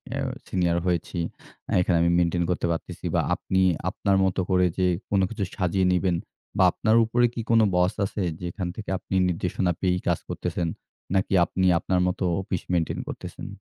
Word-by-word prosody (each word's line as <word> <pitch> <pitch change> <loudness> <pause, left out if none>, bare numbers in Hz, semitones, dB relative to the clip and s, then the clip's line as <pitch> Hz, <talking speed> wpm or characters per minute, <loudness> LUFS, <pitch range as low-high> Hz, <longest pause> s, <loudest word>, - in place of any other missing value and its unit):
আ - - -3 0.3
senior 85 -2 +1
হয়েছি। 85 0 -1 0.6
এখানে 90 -1 +2
আমি 85 0 +3
maintain 85 0 +1
করতে 90 - 0
পারতেছি 80 - -5
বা - - +4
আপনি 95 0 0 0.3
আপনার 100 -1 0
মত 95 0 0
করে 90 -1 +4
যে, 95 - +2 0.2
কোন 100 - +2
কিছু 110 -3 -3
সাজিয়ে 95 -1 +1
নিবেন 90 -1 +2 0.4
বা - - +5
আপনার 110 0 +1
উপরে 120 +2 +2
কি 115 - -3
কোন 115 - +6 0.2
boss 90 +1 +3
আছে 100 - -4 0.2
যেখান 90 +1 -4
থেকে 105 -3 -7
আপনি 95 - -5
নির্দেশনা 90 +1 0
পেয়েই 90 -1 +1
কাজ - - +2
করতেছেন? 85 - -2 0.5
নাকি 95 0 +1
আপনি 95 +3 -1
আপনার 90 +1 0
মতো 90 - -2 0.2
অফিস 95 -2 -3
maintain 85 -3 0
করতেছেন? - - -7
90 Hz, 170 wpm, -25 LUFS, 90-95 Hz, 0.6 s, কোন